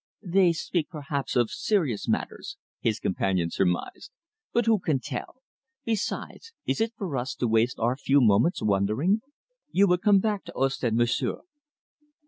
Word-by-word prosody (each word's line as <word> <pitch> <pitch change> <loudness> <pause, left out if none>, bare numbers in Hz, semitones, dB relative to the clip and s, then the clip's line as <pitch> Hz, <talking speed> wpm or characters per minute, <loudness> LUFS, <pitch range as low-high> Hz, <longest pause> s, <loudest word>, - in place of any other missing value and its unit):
"They 180 0 +4
speak, 165 0 -2
perhaps, 145 -3 -4
of 120 -3 +2
serious 160 - 0
matters," 385 - -3 0.2
his 110 -3 0
companion 95 -2 0
surmised, 90 - -1 0.4
"but 235 -1 +1
who 225 -2 +4
can 155 -6 0
tell? 145 - -7 0.4
Besides, 230 - -3
is - - 0
it 225 +1 0
for 180 -8 -4
us 125 +2 -3
to 125 - -1
waste 115 +2 +2
our 120 +2 +1
few 140 +1 +3
moments 115 - +3
wondering? 110 - +1 0.5
You 200 -7 +4
will 180 -2 +3
come 205 +2 +5
back 205 0 0
to - - -9
Ostend, 130 -4 0
monsieur?" 120 0 0
140 Hz, 150 wpm, -26 LUFS, -, 0.5 s, come